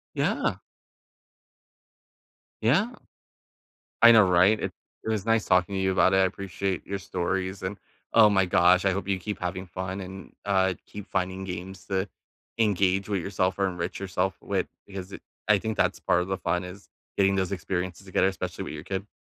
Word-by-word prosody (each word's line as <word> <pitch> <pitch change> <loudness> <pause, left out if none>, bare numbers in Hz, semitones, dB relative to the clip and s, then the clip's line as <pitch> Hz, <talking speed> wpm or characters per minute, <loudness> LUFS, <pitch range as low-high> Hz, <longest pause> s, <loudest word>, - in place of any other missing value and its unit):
Yeah. - - +1 2.1
Yeah. 170 - +3 1.1
I 115 0 +10
know, 115 - +8
right? 90 +5 +5
It - - -3 0.3
it - - -6
was 110 -3 -1
nice 115 -1 +2
talking 90 +1 +3
to 95 - -1
you 95 0 +2
about 95 0 +4
it. 95 - +4
I - - +5
appreciate 95 -1 -3
your 100 0 -3
stories, 95 0 -2
and 95 +2 -4 0.3
oh 110 -2 +7
my 95 -2 +3
gosh, 90 +1 +4
I 95 - +4
hope 95 0 -3
you 95 -1 +1
keep 105 +2 -5
having 90 +1 -3
fun 95 +2 -5
and, 95 +1 -9
uh, 95 -2 +2
keep 105 -1 -9
finding 95 0 -1
games 95 +1 -7
to 95 0 -1 0.5
engage 100 -3 +2
with 100 -4 -1
yourself 95 0 -1
or 100 - +2
enrich 90 -1 -3
yourself 95 -1 -1
with - - -1 0.2
because 95 -1 -8
it - - -9 0.3
I 105 - +6
think 110 +2 -3
that's - - +1
part 90 - +2
of 90 - -6
the 95 - -1
fun, 90 0 -1
is 90 +2 -10 0.3
getting 95 0 +3
those 95 0 0
experiences 95 0 -3
together, 95 - +2
especially 95 -4 -4
with - - -6
your - - -8
kid. 95 +1 -4
95 Hz, 185 wpm, -27 LUFS, 90-100 Hz, 2.1 s, I